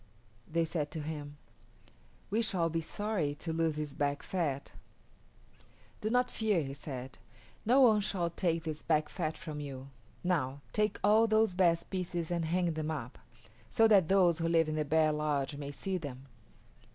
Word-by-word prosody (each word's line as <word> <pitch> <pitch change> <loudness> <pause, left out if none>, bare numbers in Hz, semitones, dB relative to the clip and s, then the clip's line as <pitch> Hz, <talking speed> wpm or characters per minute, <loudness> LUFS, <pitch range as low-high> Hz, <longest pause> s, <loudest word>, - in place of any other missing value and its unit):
They 165 +1 +2
said 155 -2 -2
to 160 - -3
him, 145 -1 -6 0.9
"We 220 +3 +2
shall 180 -7 +1
be 165 0 0
sorry 180 -4 -2
to 160 +2 -4
lose 165 -1 +1
this 150 -2 -4
back 145 0 -1
fat." 150 -7 -2 1.3
"Do 215 - -1
not 250 +2 +2
fear," 210 -7 +1
he 135 0 -5
said. 130 -2 -7 0.5
"No 255 +4 +6
one 220 -5 +6
shall 180 -4 -1
take 165 -1 0
this 155 -2 -4
back 155 -2 +1
fat 160 -3 -3
from 155 -3 -6
you. 135 -2 -7 0.3
Now, 145 -6 0
take 210 0 +1
all 215 +3 +5
those 220 -2 +3
best 175 -2 +2
pieces 175 -3 -2
and 170 -1 0
hang 175 +1 +1
them 155 0 -3
up, 140 -5 -5 0.5
so 225 - +5
that 195 -6 +6
those 180 -3 +4
who 165 - 0
live 165 -1 +3
in 155 - -2
the 155 -1 0
bear 155 +1 +3
lodge 150 -2 -1
may 140 0 -6
see 185 +6 -3
them." 135 -4 -7
165 Hz, 175 wpm, -32 LUFS, 150-185 Hz, 1.3 s, No